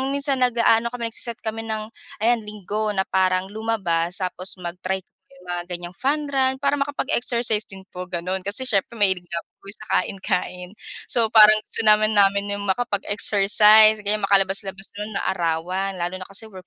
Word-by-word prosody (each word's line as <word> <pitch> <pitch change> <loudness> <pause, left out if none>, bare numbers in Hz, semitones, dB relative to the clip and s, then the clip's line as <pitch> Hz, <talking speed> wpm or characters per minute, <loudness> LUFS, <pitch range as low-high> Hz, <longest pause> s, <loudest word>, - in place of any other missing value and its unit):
nung 270 +1 -2
minsan 280 -1 +1
nag-aano 235 -2 +3
kami, 235 -2 -4
nagse-set 235 +1 -8
kami 225 0 -4
ng 215 0 -4 0.3
ayan, 235 +1 +3
Linggo 210 +1 -3
na 190 - +1
parang 185 0 0
lumabas 195 -5 -2
tapos 185 +1 -4
mag-try 185 +2 -4
yung 180 0 -24
mga 175 0 -2
gan'yang 175 0 -7
fun 290 +2 -1
run 265 -1 +1
para 280 0 +1
makapag-exercise 240 -6 -1
din 190 -1 -11
po 180 0 -7
gano'n. 185 +2 -4
Kasi 205 +6 -3
siyempre 225 -4 -1
mahilig 190 -5 +1
nga 170 0 -4 0.2
po - - -21
sa 215 - -13 0.2
kain-kain. 180 -2 -4 0.4
So, 235 -2 +3
parang 215 0 +9
gusto - - -3
namin 215 0 +4
namin 200 0 +3
yung 205 - -5
makapag-exercise 210 0 +4
o - - -12
kaya 210 0 +1
makalabas-labas 195 0 0 0.2
nun 215 -1 -4
maarawan 185 +2 -2
lalo 175 +1 -3
na - - -8
kasi 200 +3 -9
work 185 -4 -13
205 Hz, 170 wpm, -22 LUFS, 185-225 Hz, 0.4 s, parang